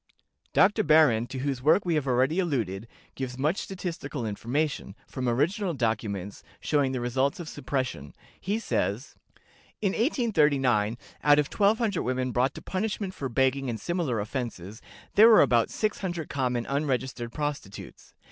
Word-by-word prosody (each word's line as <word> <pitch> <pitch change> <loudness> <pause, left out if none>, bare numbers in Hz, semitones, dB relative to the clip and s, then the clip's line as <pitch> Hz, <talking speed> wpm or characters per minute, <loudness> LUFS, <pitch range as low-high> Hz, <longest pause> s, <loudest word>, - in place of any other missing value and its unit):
Dr. 205 +2 +4
Behrend, 145 -7 +4
to 135 - -6
whose 135 -1 -2
work 155 +8 +4
we 175 - +1
have 150 -3 0
already 130 +7 +2
alluded, 115 - -1 0.3
gives 125 -2 -5
much 155 +8 +1
statistical 170 -9 -5
information, 120 +1 -2
from 130 -2 -3
original 170 - 0
documents, 105 -5 -2 0.2
showing 145 -3 +1
the 130 - -2
results 130 +5 0
of 170 - -6
suppression. 130 - -4 0.2
He 200 +3 -1
says: 230 - -2 0.6
"In 200 -3 +1
1839, 150 - +2 0.3
out 145 0 +6
of 150 -1 0
1200 210 -1 +2
women 130 0 -1
brought 125 +3 +1
to - - -9
punishment 195 0 -3
for 135 -7 -4
begging 130 +2 +1
and 115 -2 -3
similar 160 - -1
offenses, 110 -2 -5 0.3
there 220 +2 +8
were 220 - +8
about 120 -4 +2
600 185 -7 -2
common 125 -4 -1
unregistered 130 -4 -2
prostitutes. 145 -8 -6
135 Hz, 145 wpm, -27 LUFS, 120-170 Hz, 0.6 s, there